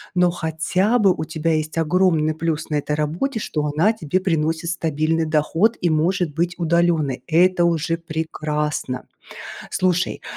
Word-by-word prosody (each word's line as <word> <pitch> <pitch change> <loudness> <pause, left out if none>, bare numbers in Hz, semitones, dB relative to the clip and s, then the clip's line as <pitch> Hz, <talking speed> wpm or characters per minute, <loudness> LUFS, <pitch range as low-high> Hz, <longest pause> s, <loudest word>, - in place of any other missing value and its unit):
но 180 -1 +4
хотя 175 +7 0
бы 195 -5 +4
у 155 - -4
тебя 160 0 -1
есть 155 +1 -2
огромный 165 -2 +2
плюс 160 -1 -3
на 150 - +1
этой 150 +1 -2
работе, 170 - -2
что 150 -6 -2
она 205 +8 +3
тебе 185 -3 -1
приносит 165 -2 -1
стабильный 160 0 0
доход 165 +8 +1
и 175 -2 +1
может 165 0 +1
быть 170 +2 -1
удалённой. 165 -5 +1
Это 175 +1 +3
уже 165 0 0
прекрасно! 150 -4 -3 0.7
Слушай, 185 -1 0
165 Hz, 145 wpm, -21 LUFS, 155-175 Hz, 0.7 s, но